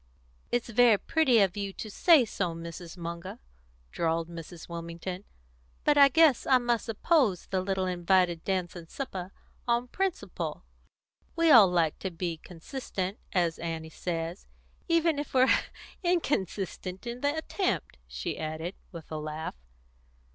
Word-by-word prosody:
"It's 240 Hz, -1 st, 0 dB
very 230 Hz, -1 st, +5 dB
pretty 260 Hz, -3 st, +3 dB
of 190 Hz, -2 st, +2 dB
you 200 Hz, -1 st, -3 dB
to 215 Hz, -, -7 dB
say 315 Hz, -, +5 dB
so, 180 Hz, -5 st, -2 dB
Mrs. 165 Hz, +1 st, -8 dB
Munger," 170 Hz, +1 st, -6 dB, 0.5 s
drawled 165 Hz, 0 st, -1 dB
Mrs. 170 Hz, 0 st, -9 dB
Wilmington. 170 Hz, +3 st, -6 dB, 0.6 s
"But 295 Hz, -, +4 dB
I 280 Hz, -1 st, +8 dB
guess 300 Hz, -2 st, +4 dB
I 260 Hz, -, +6 dB
must 240 Hz, -2 st, -1 dB
oppose 225 Hz, -, +2 dB
the 190 Hz, -1 st, -1 dB
little 190 Hz, 0 st, -1 dB
invited 180 Hz, -1 st, +2 dB
dance 185 Hz, -2 st, -1 dB
and 165 Hz, -2 st, -10 dB
supper, 190 Hz, -9 st, -5 dB, 0.4 s
on 240 Hz, +1 st, +1 dB
principle. 385 Hz, +3 st, -3 dB, 0.7 s
We 330 Hz, -1 st, +4 dB
all 225 Hz, -7 st, +9 dB
like 170 Hz, -3 st, +1 dB
to 190 Hz, -, -3 dB
be 170 Hz, -1 st, -3 dB
consistent, 190 Hz, -, -5 dB
as 170 Hz, -3 st, +1 dB
Annie 160 Hz, -1 st, -4 dB
says 165 Hz, +1 st, -4 dB, 0.4 s
even 335 Hz, -3 st, +2 dB
if 290 Hz, -2 st, -6 dB
we're 255 Hz, 0 st, +6 dB, 0.5 s
inconsistent 200 Hz, -, -1 dB
in 240 Hz, +1 st, -5 dB
the 285 Hz, +2 st, +1 dB
attempt," 315 Hz, -, -2 dB
she -, -, -4 dB
added, 160 Hz, +3 st, -4 dB, 0.2 s
with 165 Hz, -4 st, -10 dB
a 155 Hz, -, -3 dB
laugh. 155 Hz, +1 st, -5 dB
190 Hz, 140 wpm, -29 LUFS, 170-245 Hz, 0.7 s, all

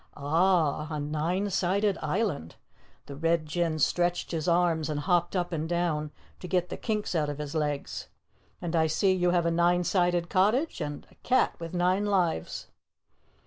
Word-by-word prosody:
"Ah, 155 Hz, 0 st, +2 dB
a 155 Hz, -2 st, -3 dB
nine 160 Hz, +7 st, -1 dB
sided 195 Hz, +2 st, +1 dB
island!" 155 Hz, -, -2 dB, 0.5 s
The 140 Hz, -, -8 dB
Red 165 Hz, +2 st, +1 dB
Jinn 160 Hz, 0 st, -1 dB
stretched 175 Hz, +4 st, +1 dB
his 165 Hz, 0 st, -2 dB
arms 170 Hz, -2 st, +2 dB
and 150 Hz, -1 st, -2 dB
hopped 175 Hz, +1 st, +1 dB
up 175 Hz, -1 st, -1 dB
and 160 Hz, 0 st, -2 dB
down 170 Hz, -3 st, 0 dB, 0.3 s
to 180 Hz, -, -7 dB
get 180 Hz, -1 st, 0 dB
the -, -, -4 dB
kinks 215 Hz, -4 st, -2 dB
out 155 Hz, -4 st, 0 dB
of 145 Hz, -, -4 dB
his 150 Hz, 0 st, -5 dB
legs. 150 Hz, -3 st, -2 dB, 0.5 s
"And 175 Hz, -1 st, -3 dB
I 160 Hz, -1 st, +3 dB
see 190 Hz, +5 st, +2 dB
you 180 Hz, -1 st, +2 dB
have 175 Hz, -1 st, +2 dB
a 170 Hz, -, +2 dB
nine 175 Hz, +1 st, +3 dB
sided 175 Hz, -1 st, +1 dB
cottage 215 Hz, -, +1 dB
and 145 Hz, 0 st, -5 dB
a -, -, -21 dB
cat 255 Hz, -, +2 dB
with 165 Hz, +1 st, -6 dB
nine 185 Hz, +3 st, +2 dB
lives." 180 Hz, -, 0 dB
175 Hz, 175 wpm, -28 LUFS, 155-180 Hz, 0.5 s, I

